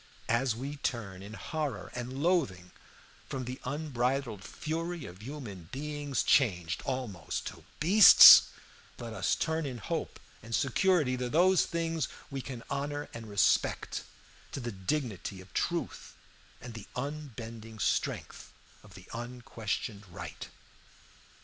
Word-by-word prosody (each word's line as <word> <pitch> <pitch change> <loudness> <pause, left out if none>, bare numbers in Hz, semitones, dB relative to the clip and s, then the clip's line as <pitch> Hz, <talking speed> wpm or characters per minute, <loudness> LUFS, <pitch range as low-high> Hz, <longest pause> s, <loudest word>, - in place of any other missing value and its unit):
As 120 0 +2
we 140 +5 -5
turn 105 -9 -3
in 100 +2 -9
horror 145 - -4
and 125 +3 -5
loathing 100 - +1 0.6
from 130 -2 -4
the 125 +2 -6
unbridled 130 -6 -2
fury 165 - -4
of 90 +3 -11
human 110 - -8
beings, 145 0 -2
changed 90 - +2
almost 125 - -3
to - - -8 0.2
beasts, 190 +6 +10 0.5
so 120 - -7
let 115 - -6
us - - +1
turn 160 -1 -1
in 125 -3 -5
hope 105 - -4 0.2
and 115 +1 -3
security 145 -1 +2
to 125 -1 -2
those 180 +5 +4
things 165 -3 -1 0.2
we 135 -1 -3
can 125 -3 -7
honor 145 +1 -3
and 115 -2 -8
respect, 100 -2 +1 0.5
to - - -4
the 120 -2 -4
dignity 100 - -3
of 95 0 -14
truth - - -3 0.4
and 120 0 -9
the 115 -3 -9
unbending 115 -6 -6
strength 105 - -2 0.3
of 100 -2 -14 0.2
unquestioned 115 -3 -5
right. 90 0 -8
125 Hz, 130 wpm, -30 LUFS, 110-145 Hz, 0.6 s, beasts